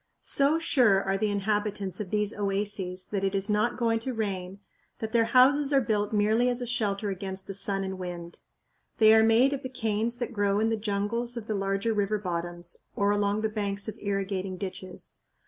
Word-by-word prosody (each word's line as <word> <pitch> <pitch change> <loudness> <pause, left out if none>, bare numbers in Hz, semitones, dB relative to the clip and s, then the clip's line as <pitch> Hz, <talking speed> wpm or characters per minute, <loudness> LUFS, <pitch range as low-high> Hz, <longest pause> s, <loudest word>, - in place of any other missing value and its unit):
So 280 +3 +3
sure 240 -12 +3
are 195 0 0
the 210 +2 0
inhabitants 205 -2 -1
of 205 -4 -4
these 210 0 0
oases 195 -2 -1
that 200 -2 -1
it 195 0 0
is 195 +2 +3
not 215 +3 +1
going 230 -2 +1
to 250 +2 -4
rain 195 -3 -3 0.4
that 220 -1 -5
their 230 -1 +3
houses 270 +4 +4
are 275 - +5
built 210 -4 0
merely 220 +3 +2
as 245 0 0
a 245 - -3
shelter 210 -4 -1
against 190 0 -5
the 195 - -6
sun 195 0 +1
and 190 0 -5
wind. 175 -2 -7 0.6
They 220 -1 +7
are 220 - +6
made 230 +5 +4
of 275 - -4
the 260 - -5
canes 230 -1 -1
that 245 0 -4
grow 205 -1 +1
in 220 +1 +2
the 225 - +1
jungles 220 +3 -2
of 230 - -5
the 220 - -2
larger 195 +2 -1
river 210 0 0
bottoms, 175 -2 -3 0.2
or 200 0 +2
along 205 0 +1
the 220 - 0
banks 205 -1 -2
of 220 - -5
irrigating 195 -2 -2
ditches. 185 -1 -7
205 Hz, 200 wpm, -27 LUFS, 195-225 Hz, 0.6 s, They